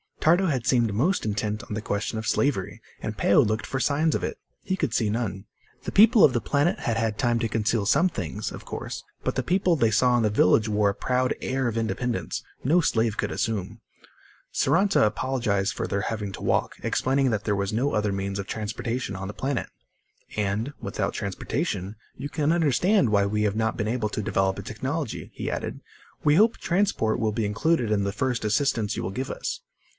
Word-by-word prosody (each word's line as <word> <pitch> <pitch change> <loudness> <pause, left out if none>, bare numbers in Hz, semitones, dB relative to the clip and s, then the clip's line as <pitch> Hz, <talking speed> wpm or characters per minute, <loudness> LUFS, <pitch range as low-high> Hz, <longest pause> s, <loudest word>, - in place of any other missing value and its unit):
Tardo 175 +4 +4
had 130 -7 -1
seemed 120 -5 +3
most 155 - +1
intent 105 +1 -2
on 110 - -7
the 110 - -2
question 105 +2 -2
of 110 - -5
slavery, 140 -10 0 0.2
and - - -4
Peo - - +4
looked 110 +2 +2
for 130 - -2
signs 150 +3 +2
of - - -1
it. - - -3 0.2
He 190 - -1
could 155 -10 -1
see 110 -3 +1
none. 105 -3 -2 0.4
The - - -4
people 220 +2 +7
of 130 - +7
the 120 - 0
planet 145 - +1
had 115 - -1
had 110 -1 -1
time 120 -3 +2
to 115 -1 -1
conceal 110 -1 0
some 160 - +4
things, 95 - -4
of - - -8
course. - - -6 0.2
But - - 0
the - - 0
people 180 -1 +2
they 115 -7 +3
saw 120 +3 +3
in 120 - +2
the 105 - +3
village 105 +1 +3
wore 105 -1 +2
a - - -1
proud 125 +2 0
air 130 0 -1
of 115 -1 -2
independence 115 +2 -2 0.2
no 165 +7 +4
slave 115 -8 +1
could - - -1
assume. 105 -5 -3 0.7
Saranta 195 - +3
apologized 105 -3 0
for - - -3
their 100 - -1
having 105 -2 -3
to - - -8
walk, - - +1
explaining 135 0 +1
that 105 -1 -1
there 105 - +1
was 100 +1 -2
no 130 +6 0
other 105 -1 +1
means 100 0 -3
of 100 - -3
transportation 110 +1 -3
on 95 0 -5
the 105 - -6
planet. 135 -2 -2 0.7
"And, 105 +6 -1
without - - -2
transportation, 100 - -3 0.2
you 140 +3 -6
can 150 0 +1
understand 170 - +3
why 100 -1 +3
we 105 +1 0
have 105 -1 +1
not 110 0 0
been 105 - -1
able 110 -1 -1
to 110 - -3
develop 95 -2 +1
a - - -6
technology," 130 +5 -4
he - - -3
added. - - -4 0.4
"We 150 0 +4
hope 220 +6 +4
transport 175 - +1
will 110 -2 +1
be 110 0 -1
included 115 +3 +1
in 100 -2 +2
the 100 - -1
first 125 +2 -1
assistance 110 -2 +1
you - - -3
will 95 - -3
give 130 +7 -4
us." - - -4
115 Hz, 210 wpm, -26 LUFS, 105-140 Hz, 0.7 s, people